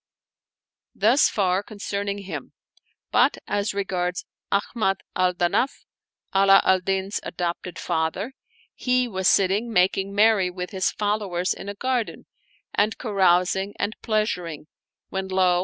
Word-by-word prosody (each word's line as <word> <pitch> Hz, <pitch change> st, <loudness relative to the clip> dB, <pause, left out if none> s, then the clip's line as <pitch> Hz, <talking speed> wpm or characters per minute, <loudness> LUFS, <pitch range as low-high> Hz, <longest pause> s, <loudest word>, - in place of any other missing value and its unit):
Thus 235 Hz, +8 st, +4 dB
far 190 Hz, -2 st, +1 dB
concerning 200 Hz, -1 st, -4 dB
him; 160 Hz, -8 st, -7 dB, 0.6 s
but -, -, +4 dB
as 205 Hz, 0 st, -1 dB
regards 180 Hz, -2 st, -2 dB, 0.3 s
Ahmad 200 Hz, -1 st, 0 dB
al 180 Hz, 0 st, +2 dB
Danaf, 175 Hz, +10 st, 0 dB, 0.5 s
Ala 195 Hz, 0 st, +6 dB
al 190 Hz, 0 st, +4 dB
Din's 195 Hz, +2 st, -1 dB
adopted 175 Hz, 0 st, -4 dB
father, 165 Hz, +12 st, -2 dB, 0.4 s
he 250 Hz, 0 st, +1 dB
was 190 Hz, -4 st, -1 dB
sitting 200 Hz, +6 st, +3 dB
making 195 Hz, 0 st, +2 dB
merry 210 Hz, -3 st, +4 dB
with 180 Hz, +1 st, -6 dB
his 190 Hz, -2 st, +1 dB
followers 205 Hz, -4 st, -1 dB
in 200 Hz, -, -8 dB
a 200 Hz, -, -5 dB
garden, 250 Hz, 0 st, -2 dB, 0.5 s
and 210 Hz, +2 st, +1 dB
carousing 190 Hz, -2 st, +2 dB
and 215 Hz, -, -2 dB
pleasuring 180 Hz, -9 st, -1 dB, 0.4 s
when 190 Hz, 0 st, -3 dB
lo! 185 Hz, -2 st, +3 dB
195 Hz, 125 wpm, -24 LUFS, 180-210 Hz, 0.6 s, Ala